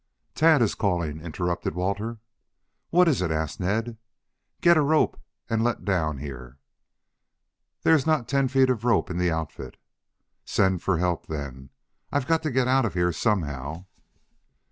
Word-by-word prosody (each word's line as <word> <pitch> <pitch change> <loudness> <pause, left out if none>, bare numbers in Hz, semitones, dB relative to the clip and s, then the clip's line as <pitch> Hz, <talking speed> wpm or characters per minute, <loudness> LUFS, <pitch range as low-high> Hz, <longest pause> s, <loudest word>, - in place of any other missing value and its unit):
"Tad 155 -4 +5
is 110 - +1
calling," 85 -6 -1
interrupted 85 0 -3
Walter. 100 +6 -2 0.7
"What 180 +1 +4
is 140 - +2
it?" 90 - 0
asked 80 +4 -2
Ned. 110 +5 -1 0.6
"Get 170 0 +5
a 155 - +4
rope 150 +2 +2 0.3
and 115 0 0
let 120 -1 -1
down 80 -7 0
here." 65 -2 -8 1.3
"There - - +5
is 155 -1 +2
not 155 -7 +1
ten 135 0 +2
feet 130 0 +3
of 115 -3 -3
rope 120 -6 +2
in 90 - -3
the 90 0 +2
outfit." 80 -2 -5 0.7
"Send 95 -2 +1
for 95 -3 +1
help 90 -1 -1
then. 70 -4 -6 0.4
I've 140 -3 0
got 165 +3 +2
to 155 - -2
get 130 -2 +1
out 130 0 +3
of 105 - -3
here 90 0 +2
somehow." 80 - -2
95 Hz, 160 wpm, -25 LUFS, 80-130 Hz, 1.3 s, Tad